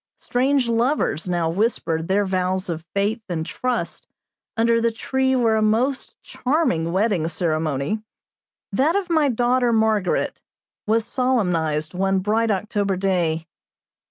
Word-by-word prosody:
Strange 260 +1 +1
lovers 230 - 0
now 175 -2 0
whisper 165 -3 0
their 195 +5 +1
vows 185 0 -1
of 165 -1 -3
faith 205 +4 0
and 160 -2 -2
trust 250 +8 -3 0.5
under 230 0 +3
the 230 0 +2
tree 265 +3 0
where 230 -3 +3
a - - +1
most 235 +6 0
charming 250 - 0
wedding 190 -4 +1
ceremony 155 +2 -1 0.7
that 280 - +2
of 385 -3 -1
my 310 -4 +3
daughter 245 0 +2
Margaret 220 -4 +1 0.5
was 220 +1 +2
solemnized 180 - 0
one 195 +1 +1
bright 215 +4 +1
October 200 -1 0
day. 175 -4 0
210 Hz, 130 wpm, -22 LUFS, 175-240 Hz, 0.7 s, under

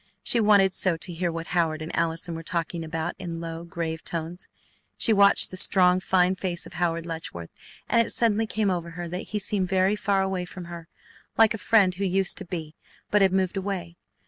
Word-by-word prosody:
She 235 - +3
wanted 200 -3 +4
so 185 -3 +1
to 175 +2 -3
hear 175 +1 -1
what 165 0 -5
Howard 165 -3 +1
and 155 +1 -5
Allison 165 +1 0
were 165 - -5
talking 165 0 -3
about 160 +1 -3
in 170 -3 -5
low, 165 0 -6
grave 165 -1 -5
tones. 170 +2 -5 0.5
She 225 - +4
watched 200 -1 +4
the 185 - -7
strong, 180 -1 +4
fine 185 0 +2
face 180 -2 -3
of - - -12
Howard 170 -2 -1
Letchworth, 160 - -7 0.4
and 235 - +4
it - - -8
suddenly 225 -1 +1
came 215 -2 0
over 170 -2 -3
her 175 0 -4
that 180 +3 -5
he 215 - -2
seemed 195 -2 -1
very 190 +1 +2
far 195 -2 +1
away 190 -2 -2
from 180 0 -9
her, 170 -1 -9 0.5
like 225 -1 +6
a 225 - -5
friend 200 -5 +4
who 190 +2 -4
used 190 0 +1
to - - -6
be, 165 -4 -6 0.4
but 210 - +4
had 190 -1 +5
moved 190 0 0
away. 185 -3 -4
180 Hz, 210 wpm, -25 LUFS, 165-195 Hz, 0.5 s, like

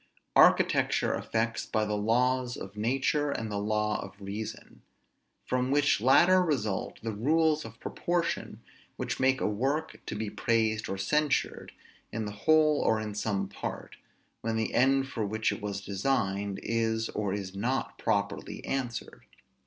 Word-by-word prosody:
Architecture - - +4
affects 115 +1 -1
by 110 0 0
the 105 0 -1
laws 125 +4 +1
of 95 +1 -8
nature 135 +6 +1
and 110 -6 -3
the 100 - -1
law 105 0 0
of 95 +1 -11
reason; 100 +2 -7 0.6
from 125 0 0
which 145 -5 +3
latter 175 +9 +6
result 120 - -1
the 115 - -2
rules 155 +8 +2
of 115 0 -11
proportion, 175 -1 -2 0.3
which - - -3
make 130 0 +3
a - - -1
work 135 +9 -1
to - - -3
be 110 +1 -3
praised 110 0 0
or 95 - -2
censured, 150 +8 0 0.4
in 110 0 -3
the 105 - -4
whole 155 +7 +3
or 110 - +2
in 105 -1 -4
some 100 -2 -1
part, - - -6 0.5
when 115 0 -1
the 110 0 -1
end 135 +1 +3
for 115 -5 -3
which 110 +2 0
it - - -5
was 100 -1 -3
designed 100 -2 -1
is 115 -1 0
or 105 -2 -2
is 95 -1 -4
not 125 +7 -2
properly - - -2
answered. 125 -3 -4
110 Hz, 155 wpm, -29 LUFS, 105-135 Hz, 0.6 s, latter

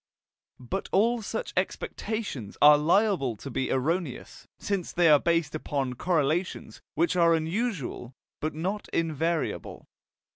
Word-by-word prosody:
But 130 +10 -4
all 230 +4 +3
such 475 - -4
expectations 195 - -3
are 150 0 +9
liable 165 - +2
to 135 +6 -8
be 130 - -1
erroneous, 155 +2 -2
since 195 -4 -3
they 175 -1 +3
are 150 -1 +7
based 165 -2 +1
upon 140 -4 -2
correlations 155 -5 -1
which 170 +3 +1
are 170 -1 +5
usual 160 - -3 0.2
but 155 0 -3
not 190 +6 -3
invariable. 165 0 -2
165 Hz, 120 wpm, -27 LUFS, 140-185 Hz, 0.2 s, are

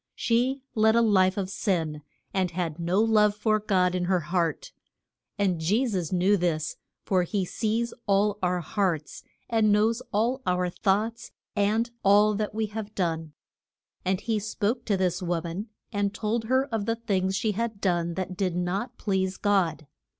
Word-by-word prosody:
She 255 +3 +1
led 220 0 +4
a 235 - +5
life 190 -3 +3
of 195 -2 -1
sin, 165 -7 -1 0.3
and 185 -2 +1
had 170 -2 -3
no 175 +3 +1
love 210 -2 +4
for 215 0 +1
God 185 -4 +2
in 180 -1 0
her 180 -1 +2
heart. 175 - -1 0.7
And 190 -5 +1
Je 210 +11 +2
sus 185 -9 -2
knew 190 +3 +3
this, 165 -3 -1 0.3
for 185 -2 +2
he 190 +2 -1
sees 225 +5 -1
all 205 +1 +2
our 180 -1 +1
hearts, 170 -4 -2 0.3
and 220 -2 +3
knows 220 +3 +2
all 235 +6 +1
our 180 -3 0
thoughts, 215 +6 0 0.3
and 215 +3 +1
all 205 +2 +5
that 210 0 -3
we 220 0 0
have 210 0 -6
done. 165 -4 -2 0.7
And 185 0 0
he 225 -2 0
spoke 215 +3 -2
to 205 -3 +1
the 180 -2 +1
wo 175 -1 0
man, 175 +6 -5 0.3
and 205 0 0
told 220 +1 -1
her 260 +3 +2
of 210 -2 -1
the 230 - +1
things 195 -5 -1
she 215 +2 +1
had 225 0 -3
done 170 -3 0
that 185 -1 -3
did 185 -2 -1
not 195 +8 -2
please 190 -2 -1
God. 185 -7 +1
200 Hz, 170 wpm, -27 LUFS, 180-220 Hz, 0.7 s, a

